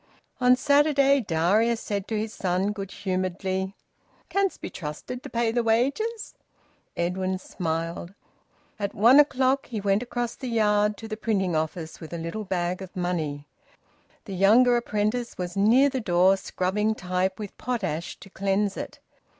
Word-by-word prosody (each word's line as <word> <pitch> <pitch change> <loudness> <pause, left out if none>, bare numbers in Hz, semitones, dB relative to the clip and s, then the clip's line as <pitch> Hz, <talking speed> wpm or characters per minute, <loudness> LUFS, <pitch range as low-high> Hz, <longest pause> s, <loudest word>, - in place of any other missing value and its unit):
On 250 0 +5
Saturday 280 0 +4
Darius 210 +6 +2
said 200 -3 -3
to 220 - -2
his 215 +1 -3
son, 185 +2 0
good 195 -2 -6
humouredly 190 0 -2 0.5
"Canst 395 -1 0
be - - -6
trusted 165 +10 -6
to - - -9
pay 230 -1 0
wages?" 260 - 0 0.6
Edwin 185 +2 -1
smiled. 170 0 -4 0.6
At 200 -1 -3
one 240 +7 +7
o'clock 270 -2 +3
he 225 -4 -4
went 200 +1 +1
across 240 -1 -3
the 260 - -7
yard 210 -2 +2
to 225 - -8
the 215 -1 -5
printing 195 -6 0
office 160 +1 -3
with 160 +1 -9
a - - -3
little 165 +6 -5
bag 180 -1 -2
of 190 -1 -9
money. 160 -5 -2 0.8
The 195 - -6
younger 225 +7 +5
apprentice 235 +1 -1
was 180 -1 -4
near 230 +8 +5
the 265 -2 -2
door 185 -1 +4
scrubbing 205 +3 -1
type 185 0 -1
with 210 -3 -7
potash 190 -10 -3
to 195 - -12
cleanse 195 +1 0
it. - - -6
205 Hz, 150 wpm, -26 LUFS, 185-235 Hz, 0.8 s, one